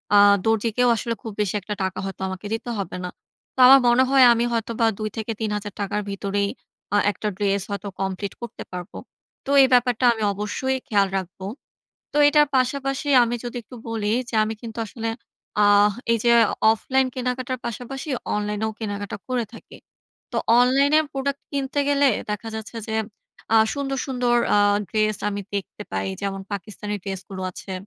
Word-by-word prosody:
আ - - +8 0.3
দরজিকেও 225 +2 +2
আসলে 230 +1 -2
খুব 225 - -6
বেশি 205 -3 0
একটা 210 +3 -4
টাকা 190 0 -2
হয়তো 195 0 -6
আমাকে 190 +2 -6
দিতে 225 +2 -4
হবে 195 - -4
না। 180 - -3 0.5
তো - - -8
আমার 270 +1 +9
মনে 240 +2 +5
হয় 270 -1 +7
আমি 235 +1 +1
হয়তোবা 230 0 0
২-৩ 220 0 -3
হাজার 205 -1 -5
টাকার 205 +1 -1
ভিতরেই 200 0 -1 0.5
আ - - +5
একটা 210 +2 -5
ড্রেস 200 -1 +1
হয়তো 200 0 -4
কমপ্লিট 195 +1 -3
করতে 235 -2 -7
পারবো। 180 -1 -7 0.5
তো - - -7
এই 265 - +6
ব্যাপারটা 245 0 +3
আমি 220 -1 -4
অবশ্যই 210 +6 -2
খেয়াল 200 -2 +3
রাখবো। 190 0 -6 0.7
তো - - 0
এটার 295 0 +5
পাশাপাশি 270 +2 0 0.2
আমি 240 0 -1
যদি 240 0 -6
একটু 250 - -13
বলি 215 -2 -1 0.2
যে - - -4
আমি 215 +1 -2
কিন্তু 230 -2 -8
আসলে 225 +2 -4 0.5
আহ 205 0 +6 0.2
এই 230 - +3
যে 240 - +4 0.4
অফলাইন 260 +4 +1
কেনাকাটার 255 0 -2
পাশাপাশি 255 +6 -5 0.3
অনলাইনেও 210 +1 -2
কেনাকাটা 205 -2 -4
করে 250 -2 0
থাকি। 230 - -13 0.5
তো - - -2 0.2
অনলাইনে 275 +5 +4
প্রোডাক্ট 275 +1 -2
কিনতে 280 0 -2
গেলে 285 0 +4 0.2
দেখা 210 +2 -3
যাচ্ছে 220 +1 -7
যে 220 - -2 0.6
আ - - +8 0.2
সুন্দর, 275 -1 -2
সুন্দর 250 -2 +1 0.2
আ - - +5 0.3
ড্রেস 215 -1 +1
আমি 205 0 -4
দেখতে 200 +1 -4
পাই। - - -2
যেমন 195 -1 -3
পাকিস্তানি 210 +1 -5
ড্রেস 195 -2 -4
গুলো 190 -1 -6
আছে। 190 - -9
220 Hz, 170 wpm, -23 LUFS, 205-255 Hz, 0.7 s, আমার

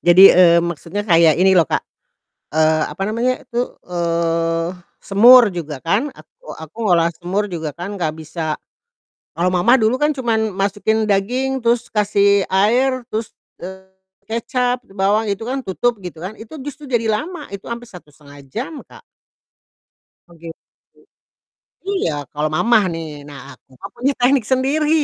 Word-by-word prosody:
Jadi, 180 +3 +8
eee, 170 -2 +6
maksudnya 170 +4 -4
kayak 165 -3 +5
ini 190 +1 +4
loh, 165 - +4
Kak, - - 0 0.7
eee, 155 0 +3
apa - - -6
namanya 240 +4 -1
itu, 235 - -3 0.2
eee, 165 -1 -1 0.3
semur 230 +2 +7
juga 155 -5 -6
kan, 200 - +1
aku - - -19
aku 160 +3 -12
ngolah 170 -2 +4
semur 180 +5 -2
juga 160 -3 -4
kan 195 +4 -6
nggak 155 -2 -1
bisa. 160 -1 -4 0.8
Kalau 175 +3 0
mama 185 +7 +3
dulu 220 +3 +2
kan 295 +2 +2
cuman 225 -5 -1
masukin 205 +3 0
daging 250 +7 0
terus 235 +1 +1
kasih 200 -2 +2
air 245 +7 +2
terus, 220 0 -4 0.3
eee, 190 +1 -9 0.4
kecap, 245 +2 -1
bawang, 200 +3 0
itu 200 +2 -3
kan 260 +4 -3
tutup 230 +5 -1
gitu 175 -4 -9
kan, 195 +4 -7
itu 220 +6 -11
justru 290 +1 -8
jadi 235 -4 0
lama, 305 +8 -4
itu 200 -1 -9
hampir 235 0 -7
1,5 145 -4 -15
jam, 240 - -5
Kak. - - -16 1.3
Oh, 170 - -17
gitu. 165 -1 -9 1.3
Iya, 395 - 0 0.2
kalau 150 +1 -1
mama 230 +7 +4 0.2
nih, 165 0 -5 0.2
nah 145 -2 -10
aku - - -25
mah - - -7
punya 265 +4 0
teknik 245 -2 +3
sendiri. 275 +4 +1
200 Hz, 150 wpm, -19 LUFS, 170-240 Hz, 1.3 s, Jadi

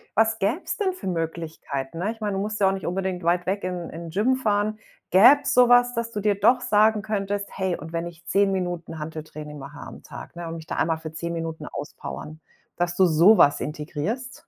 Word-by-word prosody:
was 225 0 +3
gäbe 225 - 0
es - - -2
denn 385 -3 0
für 360 - -8
Möglichkeiten, 165 -4 -4
ne, 200 +5 0
ich 225 - -11
meine, 205 -1 -1
du - - -1
musst 210 +1 -3
ja 195 - +4
auch 195 - 0
nicht 190 - -5
unbedingt 185 -1 -2
weit 175 +1 +1
weg 195 +1 -1
in 180 -2 -4
in 165 +1 -7
'n - - -7
Gym 220 +9 +2
fahren. 215 -2 0 0.3
Gäbe 245 +10 +8
es 265 -1 0
so 250 -1 +6
was, 245 0 +5
dass 230 0 -2
du 210 - -3
dir 205 -1 +2
doch 240 +5 +5
sagen 215 -1 +3
könntest: 205 -1 -2
„Hey, 190 -2 -2
und 160 +2 -10
wenn 165 0 -2
ich 170 0 -13
10 200 0 +3
Minuten 175 -4 -3
Hanteltraining 155 -1 -7
mache 145 +2 -10
am - - -10
Tag, - - -10
ne, 170 -1 -6
und 165 - -5
mich 160 -1 -11
da - - -4
einmal 160 0 +1
für 160 -1 -8
10 170 +1 -4
Minuten 160 -2 -4
auspowern”, 155 +1 -7 0.4
dass 175 0 0
du 190 - +6
so 175 +6 +6
was 145 - +5
integrierst? 160 - -4
185 Hz, 230 wpm, -24 LUFS, 165-215 Hz, 0.4 s, Gäbe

